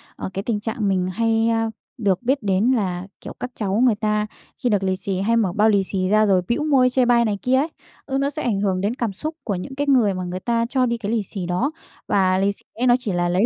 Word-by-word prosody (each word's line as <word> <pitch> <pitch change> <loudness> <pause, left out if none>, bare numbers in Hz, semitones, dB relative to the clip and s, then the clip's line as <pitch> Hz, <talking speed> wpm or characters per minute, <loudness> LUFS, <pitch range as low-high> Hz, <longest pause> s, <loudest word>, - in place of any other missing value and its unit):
ờ, - - -5
cái 195 - -3
tình 220 -2 -1
trạng 215 0 -2
mình 185 -2 +1
hay, 225 +2 +2
ơ, 225 0 +1 0.3
được 200 -6 +1
biết 265 +4 +2
đến 200 +5 +2
là, 190 -6 -1
kiểu, - - -8
các 250 - -5
cháu 205 0 -1
người 240 -4 +4
ta 210 0 0 0.4
khi 245 - +2
được 205 -3 +1
lì 190 0 +1
xì, 190 0 -3
hay 230 +4 +2
mở 200 -6 +1
bao 215 +2 +4
lì 200 -2 +3
xì 185 -1 -2
ra 215 +1 +4
rồi 190 -3 +3
bĩu 240 +6 0
môi 270 -4 +4
chê 255 0 +2
bai 240 -1 +4
này 210 -2 0
kia 255 +1 +2
ấy, 275 +4 +2 0.4
ừ, 270 - -2
nó 275 +1 +1
sẽ 300 +2 -5
ảnh 215 -5 0
hưởng 190 -2 0
đến 205 +5 -1
cảm 235 -5 -2
xúc 310 - -5
của 205 - -2
những 225 +10 -6
cái 285 +1 -2
người 245 -8 +4
mà 185 0 -4
người 180 +1 -4
ta 230 +3 0
cho 255 -1 +2
đi 235 -1 -1
cái 215 -2 -4
lì 225 -2 +1
xì 190 -1 -6
đó. 180 - 0 0.4
Và 185 -2 +3
lì 195 +1 +2
xì 200 - -12
ấy 250 +3 0
nó 240 - +6
chỉ 240 -5 -3
là 175 0 +1
lấy 185 +5 +2
215 Hz, 280 wpm, -22 LUFS, 195-245 Hz, 0.4 s, nó